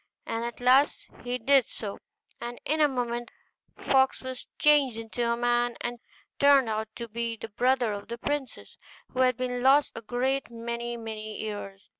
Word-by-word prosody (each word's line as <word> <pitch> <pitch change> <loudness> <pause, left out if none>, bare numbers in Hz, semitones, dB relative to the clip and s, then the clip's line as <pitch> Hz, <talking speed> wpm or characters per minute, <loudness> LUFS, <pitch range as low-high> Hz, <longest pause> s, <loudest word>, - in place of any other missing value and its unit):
And 230 0 -2
at 235 0 -5
last 260 +4 +4 0.2
he 245 0 -2
did 265 +1 +4
so, 200 -2 -6 0.4
and 240 0 -5
in 310 +1 +1
a 300 - +7
moment 240 -3 -2 0.5
the - - -13
fox 265 -1 +3
was 260 -1 -6
changed 285 -6 +4
into 235 +1 -2
a 235 - 0
man, 240 0 +1
and 240 0 -4 0.4
turned 280 -4 +6
out 220 0 -1
to 235 - -5
be 230 +1 -3
the 225 - -7
brother 245 0 +2
of 200 0 -7
the 235 - -5
princess, 285 0 -4 0.3
who 255 - -5
had 255 -2 +4
been 250 -1 -2
lost 275 +3 +5
a - - -7
great 250 +4 -1
many 235 0 -4
many 215 -1 -6
years. 205 -2 -6
240 Hz, 180 wpm, -28 LUFS, 230-260 Hz, 0.5 s, a